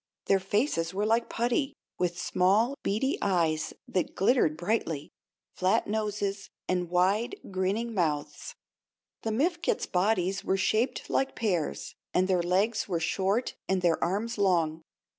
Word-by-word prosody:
Their 195 - +3
faces 190 - 0
were 205 +2 0
like 230 +2 +2
putty, 245 +4 0 0.2
with 175 -1 0
small, 195 +8 +2
beady 245 +8 0
eyes 165 -5 +1 0.2
that 185 - -1
glittered 195 - +3
brightly, 165 -5 -2 0.4
flat 185 +1 +2
noses, 205 -2 -2 0.2
and 180 -2 0
wide, 195 - +2 0.2
grinning 195 +5 -1
mouths. 155 -7 -2 0.7
The 225 - -2
Mifkets 335 +9 0
bodies 190 0 +1
were 190 - +1
shaped 220 +5 0
like 270 - 0
pears, 180 -9 -1 0.2
and 185 +1 +3
their 185 -2 +2
legs 195 +6 +1
were 175 -4 -1
short 195 +7 0 0.2
and 190 -1 +1
their 170 -2 +2
arms 210 +6 -1
long. 165 -5 +2
195 Hz, 135 wpm, -28 LUFS, 180-220 Hz, 0.7 s, Their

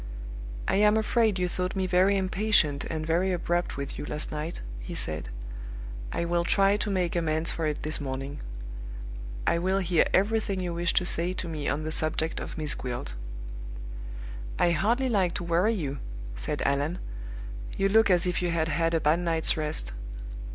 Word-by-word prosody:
"I - - +3
am 210 +1 +6
afraid 220 -2 +3
you 180 -1 +1
thought 180 +1 -2
me 190 -1 +1
very 185 +2 +4
impatient 185 -6 +3
and 155 -1 -2
very 175 +4 +2
abrupt 175 -2 0
with 140 0 -4
you - - -3
last 150 - -2
night," 155 +3 -4 0.2
he - - -6
said. 75 -6 -3 0.8
"I 170 - 0
will 170 0 +2
try 195 +3 +4
to 210 0 -1
make 180 -3 +1
amends 160 -1 +2
for 160 -2 -1
it 150 - -2
this 155 0 0
morning. 135 +1 -4 1.1
I 170 - +3
will 190 +2 +2
hear 180 -3 +3
everything 205 0 +2
you 180 -2 -2
wish 170 0 +1
to 180 - +4
say 175 +1 +1
to 185 - -4
me 155 -3 -3
on 150 +2 0
the 155 - -2
subject 155 +1 +1
of - - -6
Miss 155 -2 0
Gwilt." 125 - -4 1.4
"I 175 - +4
hardly 225 - +2
like 190 -7 +2
to - - -2
worry 175 +7 +3
you," 145 -7 -2 0.4
said - - -2
Allan. 145 +5 +1 0.8
"You 195 - +3
look 220 +1 +5
as 180 -2 +5
if 180 -1 0
you 175 - +1
had 165 -1 +1
had 165 +2 +2
a - - +4
bad 155 +2 +3
night's 165 -2 +2
rest." 150 - -2
170 Hz, 180 wpm, -28 LUFS, 155-190 Hz, 1.4 s, am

